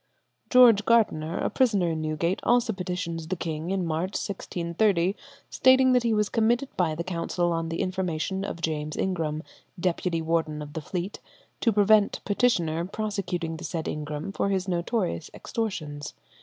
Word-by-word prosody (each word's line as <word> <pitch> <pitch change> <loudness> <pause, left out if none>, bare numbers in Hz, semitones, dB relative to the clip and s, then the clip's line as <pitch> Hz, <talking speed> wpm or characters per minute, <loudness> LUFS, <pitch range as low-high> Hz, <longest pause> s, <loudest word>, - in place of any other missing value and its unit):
George 240 -5 +7
Gardener, 195 -8 +2
a - - -1
prisoner 205 -10 +2
in 160 -1 -2
Newgate, 155 +4 -1
also 240 -1 +2
petitions 180 -3 -4
the 185 - -1
king 165 -1 -4
in 190 -2 0
March, 165 +4 -1
1630, 180 0 0 0.4
stating 260 0 +5
that 250 -1 +4
he 235 -1 +1
was 210 -1 +2
committed 240 +5 +1
by 165 -4 +1
the 170 - -3
council 175 0 -1
on 165 -1 -1
the 165 - -2
information 185 0 -2
of 170 -4 -5
James 155 -1 -2
Ingram, 160 -4 -1 0.4
deputy 175 -1 0
warden 160 -2 -1
of 145 0 -10
the 160 - -4
Fleet, 180 +5 -4 0.4
to 230 - +3
prevent 210 0 +4
petitioner 175 -8 +1
prosecuting 185 -4 -3
the 165 - -9
said 165 -1 -3
Ingram 150 +4 -4
for 200 - -1
his 190 -1 0
notorious 180 -1 -1
extortions. 155 -10 -4
180 Hz, 155 wpm, -26 LUFS, 165-205 Hz, 0.4 s, George